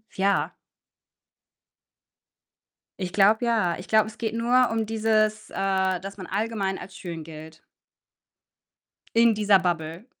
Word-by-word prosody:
ja. 200 Hz, 0 st, +1 dB, 2.5 s
Ich 185 Hz, -2 st, -4 dB
glaube, 210 Hz, +4 st, +4 dB
ja. 215 Hz, -8 st, +1 dB
Ich 180 Hz, -, -10 dB
glaube, 215 Hz, -1 st, +3 dB
es 215 Hz, 0 st, -11 dB
geht 225 Hz, -2 st, -3 dB
nur 245 Hz, +2 st, +3 dB
um 225 Hz, -1 st, 0 dB
dieses 215 Hz, 0 st, 0 dB
äh, 190 Hz, -1 st, 0 dB
dass 195 Hz, +3 st, -9 dB
man 185 Hz, -3 st, -8 dB
allgemein 200 Hz, -1 st, -2 dB
als 195 Hz, -, -11 dB
schön 170 Hz, -4 st, -7 dB
gilt 160 Hz, 0 st, -11 dB, 1.5 s
in 230 Hz, -1 st, +5 dB
dieser 205 Hz, -2 st, +4 dB
Bubble. 170 Hz, +1 st, -3 dB
200 Hz, 125 wpm, -25 LUFS, 185-220 Hz, 2.5 s, in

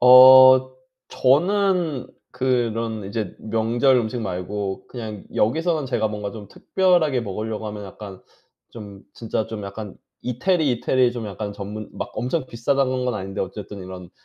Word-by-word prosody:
어 130 Hz, +1 st, +9 dB, 0.3 s
저는 175 Hz, +1 st, +1 dB, 0.2 s
그런 115 Hz, -4 st, -1 dB
이제 105 Hz, -1 st, -4 dB
명절 115 Hz, +4 st, +2 dB
음식 120 Hz, 0 st, -1 dB
말고 95 Hz, 0 st, -4 dB
그냥 110 Hz, -5 st, -7 dB
여기서는 155 Hz, +6 st, +1 dB
제가 115 Hz, -4 st, 0 dB
뭔가 105 Hz, -1 st, -5 dB
좀 105 Hz, -3 st, -9 dB
특별하게 175 Hz, -, +1 dB
먹으려고 110 Hz, +1 st, -4 dB
하면 105 Hz, -1 st, -6 dB
약간 95 Hz, 0 st, -10 dB, 0.5 s
좀 100 Hz, -3 st, -11 dB
진짜 110 Hz, -1 st, -3 dB
좀 105 Hz, -2 st, -6 dB
약간 105 Hz, +1 st, -8 dB, 0.3 s
이태리, 150 Hz, +5 st, +1 dB
이태리 125 Hz, +1 st, +1 dB
좀 120 Hz, -3 st, -5 dB
약간 100 Hz, +1 st, -5 dB
전문 105 Hz, +1 st, -7 dB
막 -, -, -6 dB
엄청 130 Hz, +4 st, -2 dB
비싸다는 130 Hz, +2 st, 0 dB
건 125 Hz, -, -1 dB
아닌데 95 Hz, -1 st, -5 dB
어쨌든 100 Hz, +1 st, -6 dB
이런 90 Hz, -1 st, -9 dB
115 Hz, 290 characters per minute, -22 LUFS, 105-130 Hz, 0.5 s, 어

